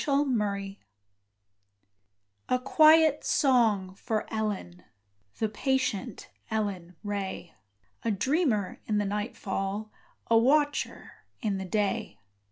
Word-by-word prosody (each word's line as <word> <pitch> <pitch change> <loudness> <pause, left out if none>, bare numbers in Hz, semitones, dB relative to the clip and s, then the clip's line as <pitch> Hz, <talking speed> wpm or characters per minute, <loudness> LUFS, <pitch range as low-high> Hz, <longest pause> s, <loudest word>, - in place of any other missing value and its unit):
Ellen 280 -2 +2
Ray 200 -1 -3 1.7
A 255 - +3
quiet 310 +3 +5
song 225 -9 +2
for 215 +2 -2
Ellen 205 -5 -3 0.5
The 220 - +1
patient 245 -1 -2 0.2
Ellen 195 -5 -3
Ray, 200 -4 -4 0.5
A 230 - -1
dreamer 225 - 0
in 215 - +1
the 205 - +1
nightfall, 205 0 -3 0.3
A 230 0 +4
watcher 290 +4 +1 0.3
in 200 -3 0
the 190 - -4
day. 210 +3 -1
215 Hz, 100 wpm, -28 LUFS, 200-260 Hz, 1.7 s, quiet